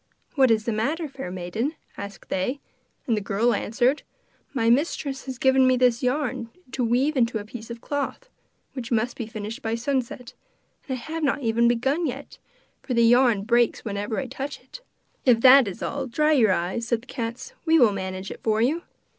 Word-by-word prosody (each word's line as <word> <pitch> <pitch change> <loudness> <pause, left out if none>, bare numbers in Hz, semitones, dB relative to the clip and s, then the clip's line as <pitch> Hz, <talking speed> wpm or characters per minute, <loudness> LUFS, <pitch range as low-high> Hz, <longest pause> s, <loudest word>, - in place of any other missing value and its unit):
'What 265 -4 +4
is 220 -1 +3
the 235 - 0
matter, 300 +10 -1
fair 270 -8 -7
maiden?' 185 - -3 0.2
asked 200 0 -9
they. 245 +10 -1 0.5
And 235 -6 +1
the 210 - -2
girl 210 +5 +1
answered: 245 +6 +1 0.5
'My 230 -5 0
mistress 270 +1 +1
has 260 -2 -5
given 265 0 +4
me 255 0 +4
this 245 -2 +3
yarn 250 -3 -1 0.2
to 260 - -1
weave 255 +6 +2
into 235 -3 +2
a 205 - -6
piece 220 +1 -9
of 235 0 -7
cloth, 285 - -3 0.5
which 250 -3 -6
must 235 +1 0
be 230 - -5
finished 220 0 -6
by 225 0 -1
sunset, 250 0 -3 0.6
and 260 - -1
I - - -9
have 320 +5 -5
not 280 -1 0
even 235 +1 +3
begun 270 +8 +1
yet, 275 +2 -7 0.4
for 255 - -3
the 235 0 +5
yarn 240 -3 +4
breaks 235 +1 +2
whenever 205 +1 -3
I 275 - -1
touch 270 +3 -6
it.' - - -13 0.4
'If 240 -3 +4
that 265 -1 +8
is 190 - -6
all, 275 -1 -3
dry 300 +6 +2
your 235 -9 +4
eyes,' 185 +6 -1
said 235 -2 0
the - - -18
cats; 235 - -5
'we 325 0 +6
will 240 -8 +6
manage 190 0 -5
it - - -9
for 220 -1 +1
you. 285 +9 +1
240 Hz, 195 wpm, -25 LUFS, 225-270 Hz, 0.6 s, that